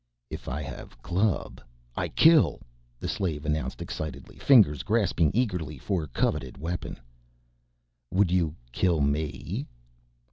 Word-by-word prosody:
"If - - -7
I 75 +4 -3
have 70 -2 -9
club, 95 +4 0 0.3
I - - -1
kill!" 160 -1 +5 0.4
the - - -4
slave 80 -6 -2
announced 75 0 -2
excitedly, 80 -1 -6
fingers 100 - +6
grasping 95 -5 +2
eagerly 90 - -1
for 85 +1 -2
coveted 65 0 -1
weapon. 85 +1 -4 1.1
"Would 95 +1 +2
you 85 -4 +1 0.2
kill 85 +3 +1
me?" 70 +1 -2
80 Hz, 115 wpm, -27 LUFS, 75-95 Hz, 1.1 s, fingers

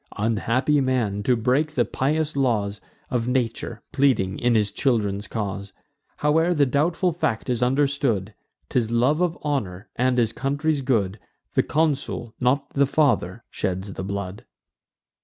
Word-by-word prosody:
Unhappy 115 +7 +1
man, 120 -6 0
to 125 +4 +2
break 130 +7 +1
the 120 - +3
pious 150 +3 -1
laws 105 -7 0 0.3
Of 120 -2 0
nature, 120 -2 -2
pleading 130 -9 +2
in 120 -1 +2
his 105 -2 +2
children's 105 -6 0
cause! 100 -2 -4 0.4
Howe'er 160 +4 +2
the 145 -2 +4
doubtful 165 +6 +1
fact 145 -7 -1
is 120 -1 -1
understood, 130 -6 +1 0.4
'Tis 120 -3 +1
love 125 +8 +2
of 175 -1 +1
honour, 105 -9 -2
and 125 0 +1
his 115 -2 +2
country's 145 +2 0
good: 110 -6 0 0.3
The - - +4
consul, 140 -7 -1
not 135 +3 +1
the 140 0 +3
father, 120 - +1
sheds 95 0 -3
the 95 - -5
blood. 100 +3 -5
125 Hz, 140 wpm, -24 LUFS, 105-140 Hz, 0.4 s, the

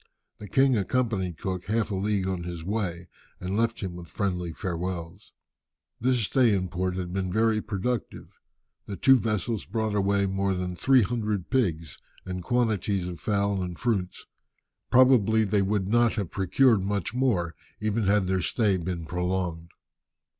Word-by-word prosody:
The 105 - -8
king 135 -1 +4
accompanied 100 -5 -1
Cook 90 -1 -4
half 110 +2 0
a - - -1
league 100 0 0
on 95 -2 -2
his 85 -1 -6
way, 90 -3 -3 0.3
and 95 +2 -3
left 115 +1 0
him 95 -3 -4
with 85 -1 -9
friendly 90 -1 -2
farewells. 90 +1 -5 0.7
This 125 +1 +2
stay 115 +3 +3
in 95 -1 -2
port 90 +1 -2
had 90 -1 -4
been 95 -1 -2
very 110 +1 +2
productive. 110 +3 -4 0.5
The 100 - -4
two 135 +4 +5
vessels 110 0 -1
brought 110 -2 -2
away 100 0 +2
more 95 0 0
than 90 0 -3
three 130 +5 +4
hundred 105 -4 -2
pigs, 85 - 0 0.3
and 90 -1 -4
quantities 105 -5 0
of 85 -3 -6
fowls 100 -1 0
and 90 -1 -5
fruits. 105 -7 -2 0.6
Probably 120 -4 +5
they 100 -1 +1
would 100 -1 0
not 120 +2 +3
have 100 -7 -3
procured 105 +3 +3
much 100 +1 -2
more, 115 -10 +1 0.3
even 110 0 0
had 105 -1 +3
their 95 0 0
stay 100 +1 +1
been 85 -1 -4
prolonged. 90 -1 -2
100 Hz, 160 wpm, -27 LUFS, 90-110 Hz, 0.7 s, two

